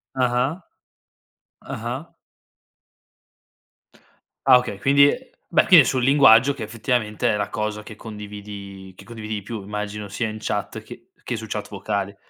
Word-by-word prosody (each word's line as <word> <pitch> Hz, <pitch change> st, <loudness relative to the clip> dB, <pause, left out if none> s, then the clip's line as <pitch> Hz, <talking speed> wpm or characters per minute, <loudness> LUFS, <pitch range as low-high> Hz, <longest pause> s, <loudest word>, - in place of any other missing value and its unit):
Ah-Ah. 130 Hz, +6 st, 0 dB, 1.0 s
Ah-Ah. 125 Hz, +8 st, -6 dB, 2.3 s
Ah, 130 Hz, -2 st, +8 dB
okay 105 Hz, -5 st, -3 dB
quindi 140 Hz, +7 st, +5 dB
è 255 Hz, -, -2 dB, 0.2 s
beh, -, -, +3 dB
quindi 170 Hz, -6 st, +9 dB
è -, -, -5 dB
sul 130 Hz, -2 st, 0 dB
linguaggio, 135 Hz, -1 st, +6 dB
che 125 Hz, -, -7 dB
effettivamente 110 Hz, -1 st, -1 dB
è 105 Hz, -, 0 dB
la 100 Hz, -, -1 dB
cosa 105 Hz, 0 st, -3 dB
che 105 Hz, 0 st, -11 dB
condividi 100 Hz, -3 st, -9 dB
che -, -, -14 dB
condividi 110 Hz, -2 st, -6 dB
di 105 Hz, -, -4 dB
più, 110 Hz, +1 st, -6 dB
immagino 105 Hz, 0 st, -5 dB
sia 110 Hz, +4 st, -2 dB
in 110 Hz, 0 st, -6 dB
chat -, -, -3 dB
che -, -, -13 dB, 0.2 s
che 120 Hz, -, -3 dB
su 110 Hz, -, -7 dB
chat 105 Hz, 0 st, -5 dB
vocale. 100 Hz, 0 st, -3 dB
110 Hz, 150 wpm, -23 LUFS, 105-125 Hz, 2.3 s, quindi